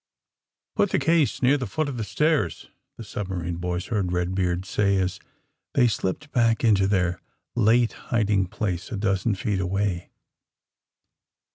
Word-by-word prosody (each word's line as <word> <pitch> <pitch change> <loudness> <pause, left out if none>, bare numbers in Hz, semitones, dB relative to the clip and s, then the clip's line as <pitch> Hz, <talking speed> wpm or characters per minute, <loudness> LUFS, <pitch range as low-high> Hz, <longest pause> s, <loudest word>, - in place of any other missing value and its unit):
'^Put 205 - +2
the - - +1
case 160 -5 +2
near 140 +3 +4
the 125 - -3
foot 155 -1 -1
of 135 -3 -4
the 115 - -2
stairs,'^ 110 - 0 0.3
the - - -7
submarine 90 -5 -4
boys 90 0 -2
heard 105 -5 -1
Eedbeard 90 0 -1
say 100 0 +1
as 95 -1 -1 0.6
they 125 -3 +5
slipped 115 +6 -2
back 115 -2 +2
into 100 -4 +4
their 90 -3 0 0.3
late 115 +1 +3 0.2
hiding 105 -4 +2
place 95 -2 -3
a 110 - -2
dozen 100 +1 +1
feet 100 0 -1
away. 95 -1 -1
100 Hz, 145 wpm, -25 LUFS, 90-115 Hz, 0.6 s, they